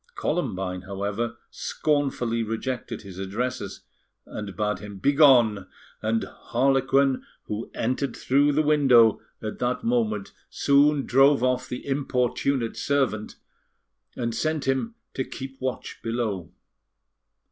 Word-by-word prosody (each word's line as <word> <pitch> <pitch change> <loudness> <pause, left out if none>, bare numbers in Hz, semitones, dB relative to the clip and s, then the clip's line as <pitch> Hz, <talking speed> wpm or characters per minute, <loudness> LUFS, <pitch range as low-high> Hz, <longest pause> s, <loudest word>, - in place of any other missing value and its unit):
Columbine, 95 - -2
however, 105 +4 -3
scornfully 135 -6 0
rejected 115 +3 -4
his 95 -2 -10
addresses, 120 +7 -3 0.4
and 100 -2 -7
bade 105 -1 -1
him 105 -1 -9
begone, 120 -5 +5 0.3
and 110 +1 0
Harlequin, 135 +1 +1 0.2
who 105 +2 -5
entered 130 +4 -1
through 140 +3 +3
the 155 +2 +3
window 135 -7 +5 0.2
at 110 - -5
that 125 +1 -1
moment, 110 -4 0 0.2
soon 140 0 +3
drove 135 +1 +5
off 125 0 +1
the 125 - -5
importunate 135 -2 0
servant, 130 -7 0 0.8
and 115 -1 -2
sent 155 +2 -1
him 135 - 0 0.2
to 130 - -1
keep 135 +1 -8
watch 130 -1 -4
below. 115 -6 -2
125 Hz, 115 wpm, -25 LUFS, 110-135 Hz, 0.8 s, begone